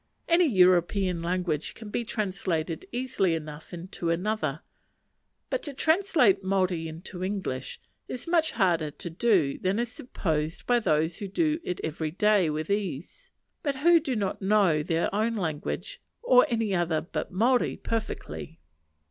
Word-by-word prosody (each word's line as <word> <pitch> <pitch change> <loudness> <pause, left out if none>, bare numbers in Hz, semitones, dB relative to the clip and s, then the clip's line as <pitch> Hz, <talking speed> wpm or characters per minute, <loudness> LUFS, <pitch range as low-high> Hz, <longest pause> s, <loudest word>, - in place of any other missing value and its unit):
Any 340 0 +5
European 180 -2 +3
language 170 -3 -2
can 220 -2 -9
be 240 - -1
translated 185 -7 -2
easily 240 -8 0
enough 155 -1 -8
into 175 -1 -5
any 170 +3 0
other; 165 -9 -1 0.9
but - - 0
to 290 -3 -5
translate 310 - +3
Maori 185 -3 0
into 175 +3 -7
English 185 -10 -3 0.3
is 250 +6 -6
much 330 -2 +2
harder 170 -7 +2
to 170 - -7
do 175 -7 +2
than 190 +2 0
is 235 0 -1
supposed 160 -10 -3
by 245 -1 +3
those 160 -4 +1
who 200 - -4
do 310 - +1
it 180 - -3
every 160 0 -2
day 200 0 +3
with 155 +3 -3
ease; 200 - -3 0.3
but 285 -2 -1
who 335 +5 +5
do 285 -5 -2
not 200 -2 -2
know 190 -6 +3
their 165 +3 0
own 220 +3 +1
language, 185 - -3 0.2
or 250 - +6
any 225 -4 0
other 170 -3 +1
but 165 - -5
Maori, 240 +7 +2
perfectly. 220 - -4
190 Hz, 150 wpm, -27 LUFS, 165-235 Hz, 0.9 s, or